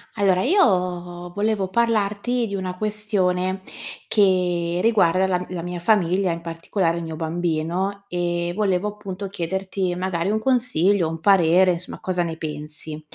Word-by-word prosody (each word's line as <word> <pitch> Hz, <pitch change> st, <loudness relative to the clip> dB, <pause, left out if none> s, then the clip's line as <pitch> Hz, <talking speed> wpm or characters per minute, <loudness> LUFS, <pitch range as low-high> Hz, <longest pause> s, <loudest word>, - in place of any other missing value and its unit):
Allora, 195 Hz, -3 st, +3 dB
io 180 Hz, -, +1 dB
volevo 205 Hz, -1 st, 0 dB
parlarti 230 Hz, +2 st, +1 dB
di 200 Hz, -, -6 dB
una 185 Hz, -2 st, -3 dB
questione 190 Hz, -3 st, -1 dB, 0.5 s
che 180 Hz, -4 st, +2 dB
riguarda 190 Hz, -5 st, +4 dB
la 185 Hz, -1 st, +1 dB
m 180 Hz, -, -6 dB
la 175 Hz, -, -3 dB
mia 175 Hz, +1 st, -5 dB
famiglia, 185 Hz, -1 st, +2 dB
in 165 Hz, -, -6 dB
particolare 165 Hz, +1 st, -1 dB
il 170 Hz, -, -4 dB
mio 160 Hz, -1 st, -5 dB
bambino, 170 Hz, +4 st, -2 dB
ehm, 175 Hz, 0 st, -1 dB
volevo, 200 Hz, 0 st, +1 dB
appunto, 200 Hz, -2 st, -7 dB
chiederti 190 Hz, 0 st, -2 dB
magari 180 Hz, -1 st, -1 dB
un 215 Hz, +1 st, +1 dB
consiglio, 210 Hz, -7 st, +2 dB
un 165 Hz, 0 st, -5 dB
parere, 185 Hz, -1 st, +5 dB
insomma, 175 Hz, +1 st, -7 dB
cosa 180 Hz, -1 st, 0 dB
ne 165 Hz, -1 st, -3 dB
pensi. 150 Hz, 0 st, -7 dB
185 Hz, 145 wpm, -23 LUFS, 170-200 Hz, 0.5 s, parere